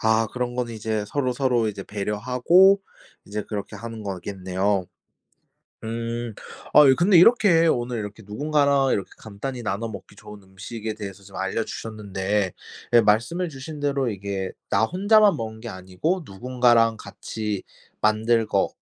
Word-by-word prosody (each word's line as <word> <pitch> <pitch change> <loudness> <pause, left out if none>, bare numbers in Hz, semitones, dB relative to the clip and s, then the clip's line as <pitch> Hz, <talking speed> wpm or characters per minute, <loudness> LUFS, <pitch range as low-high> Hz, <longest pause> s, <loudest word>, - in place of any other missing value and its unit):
아 110 0 +3
그런 125 -1 -3
거는 120 -2 -2
이제 110 -1 -2
서로서로 125 -4 0
이제 100 -2 -5
배려하고 125 - +3 0.4
이제 105 +1 -4
그렇게 105 -2 -6
하는 115 -2 -7
거겠네요. 95 0 -2 1.0
음. 115 0 -4 0.4
아 150 -1 +9
이 135 - +7
근데 180 +4 +4
이렇게 175 -5 +6
오늘 120 -5 0
이렇게 105 +1 -7
누군가랑 140 +4 +2
이렇게 100 - -1
간단히 120 +4 -6
나눠 105 +2 -2
먹기 105 -2 -10
좋은 105 -1 -12
음식에 105 +3 -7
대해서 100 -2 -8
좀 95 0 -13
알려주셨는데 100 -1 -2 0.4
예 120 - +8
말씀해 120 - +1
주신 145 +1 -8
대로 140 -3 0
이게 100 -2 -4 0.2
나 105 +3 +3
혼자만 205 - +4
먹는 110 -1 -6
게 120 - -7
아니고 95 - -2
누군가랑 120 +1 +2
같이 105 -3 -5 0.4
만들 110 +1 +2
거 - - +1
115 Hz, 315 characters per minute, -24 LUFS, 105-130 Hz, 1.0 s, 아